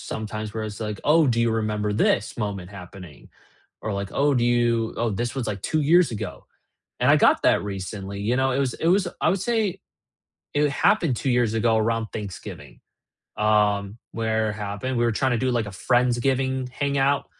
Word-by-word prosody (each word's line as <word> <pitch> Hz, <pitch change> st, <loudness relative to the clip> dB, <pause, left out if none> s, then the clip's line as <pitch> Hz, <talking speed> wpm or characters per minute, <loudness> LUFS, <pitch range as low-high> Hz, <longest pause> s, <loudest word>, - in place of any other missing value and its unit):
sometimes, 110 Hz, -1 st, -5 dB
where 110 Hz, -, -3 dB
it's 105 Hz, 0 st, -7 dB
like, 105 Hz, -2 st, -4 dB
"Oh, 155 Hz, +1 st, +5 dB
do 120 Hz, -3 st, +1 dB
you 115 Hz, 0 st, +2 dB
remember 105 Hz, -2 st, -1 dB
this 105 Hz, +1 st, +1 dB
moment 100 Hz, -5 st, -4 dB
happening?" 90 Hz, -6 st, -11 dB, 0.5 s
Or 110 Hz, -, -3 dB
like, 100 Hz, 0 st, -3 dB
"Oh, 145 Hz, +1 st, +2 dB
do 120 Hz, -2 st, +1 dB
you 120 Hz, -2 st, +1 dB
oh, 115 Hz, -2 st, 0 dB
this 120 Hz, +4 st, -2 dB
was 130 Hz, -4 st, -3 dB
like 100 Hz, -3 st, -4 dB
2 155 Hz, -, 0 dB
years 165 Hz, +1 st, +4 dB
ago," 110 Hz, -, -6 dB, 0.6 s
and -, -, +5 dB
I -, -, +6 dB
got -, -, +4 dB
that -, -, +3 dB
recently, 100 Hz, 0 st, -5 dB
you 120 Hz, +5 st, 0 dB
know, 130 Hz, 0 st, +2 dB
it 130 Hz, -, 0 dB
was 135 Hz, -3 st, 0 dB
it 165 Hz, -, -2 dB
was 185 Hz, 0 st, +3 dB
I -, -, +2 dB
would 190 Hz, -1 st, 0 dB
say, 210 Hz, -4 st, -1 dB, 0.7 s
it 145 Hz, 0 st, +2 dB
happened 165 Hz, -, +2 dB
2 135 Hz, -, -2 dB
years 120 Hz, -3 st, +2 dB
ago 115 Hz, 0 st, +2 dB
around 115 Hz, 0 st, 0 dB
Thanksgiving. 75 Hz, -, -8 dB, 0.6 s
Um, 105 Hz, -1 st, +1 dB, 0.2 s
where 110 Hz, -1 st, 0 dB
it -, -, -6 dB
happened 105 Hz, +4 st, -4 dB
we 120 Hz, -, +2 dB
were 115 Hz, -, +2 dB
trying 130 Hz, +3 st, +1 dB
to 120 Hz, -, +1 dB
do 130 Hz, +2 st, 0 dB
like 120 Hz, -3 st, 0 dB
a 105 Hz, -, -7 dB
Friends-giving 130 Hz, +3 st, +1 dB
hangout, 140 Hz, +1 st, +1 dB
115 Hz, 195 wpm, -24 LUFS, 105-130 Hz, 0.7 s, I